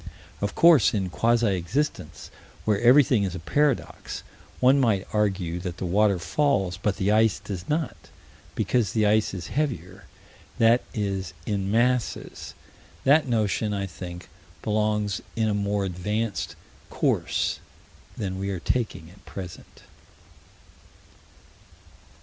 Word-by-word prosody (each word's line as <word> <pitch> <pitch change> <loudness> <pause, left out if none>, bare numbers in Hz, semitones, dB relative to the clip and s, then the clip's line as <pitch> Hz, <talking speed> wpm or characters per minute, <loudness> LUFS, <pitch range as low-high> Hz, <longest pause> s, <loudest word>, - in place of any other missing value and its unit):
Of 100 0 -2
course, 155 -12 +6
in 95 -3 -1
quasi 115 +2 +2
existence, 130 - -3 0.3
where 105 -2 +1
everything 125 -2 +6
is 95 -3 -2
a - - -5
paradox, 145 - -1 0.4
one 130 +2 +5
might 110 -7 +1
argue 95 -5 0
that 90 -2 -5
the 95 - -4
water 100 +2 +3
falls, 95 - 0
but 100 0 -1
the 100 +2 +1
ice 110 -1 +4
does 100 -3 -7
not, 155 -1 -1 0.6
because 110 -7 +1
the 110 -1 +2
ice 105 +1 +3
is 90 -4 -6
heavier 120 - -3 0.5
that 115 +2 +5
is, 100 -4 -2
in 100 -2 -1
masses. 120 +2 0 0.5
That 145 +2 +4
notion, 105 -2 0
I 100 -1 -2
think, 90 0 -8 0.4
belongs 105 -1 0
in 110 -1 +1
a 105 - +1
more 100 0 0
advanced 105 +4 -2 0.3
course - - 0 0.6
than 95 -2 -3
we 100 0 -2
are 95 -3 -3
taking 95 -5 -2
at 100 - -19
present. 90 -3 -9
105 Hz, 125 wpm, -25 LUFS, 95-115 Hz, 0.6 s, course